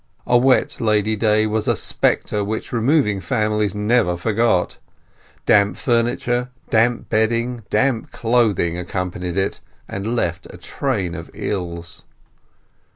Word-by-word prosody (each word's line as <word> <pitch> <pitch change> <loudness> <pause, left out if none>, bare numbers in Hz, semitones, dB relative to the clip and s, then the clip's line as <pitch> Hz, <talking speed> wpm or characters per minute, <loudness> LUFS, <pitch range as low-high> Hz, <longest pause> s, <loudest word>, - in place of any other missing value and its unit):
A 120 - +2
wet 130 +2 +3
Lady 110 -1 +2
Day 110 0 +2
was 110 0 -1
a - - +3
spectre 105 -1 0
which 110 +4 -4
removing 115 -4 +2
families 105 +3 0
never 105 -4 +2
forgot; 110 -1 +1 0.7
damp 100 0 +4
furniture, 120 0 0 0.2
damp 115 +1 +2
bedding, 115 +2 0
damp 115 +2 0
clothing 110 -8 +1
accompanied 90 0 -4
it, 95 0 -1 0.3
and 105 +5 -3
left 85 -6 -2
a - - -11
train 105 -11 -2
of 80 -1 -7
ills. 85 -3 -4
110 Hz, 120 wpm, -20 LUFS, 95-120 Hz, 0.7 s, damp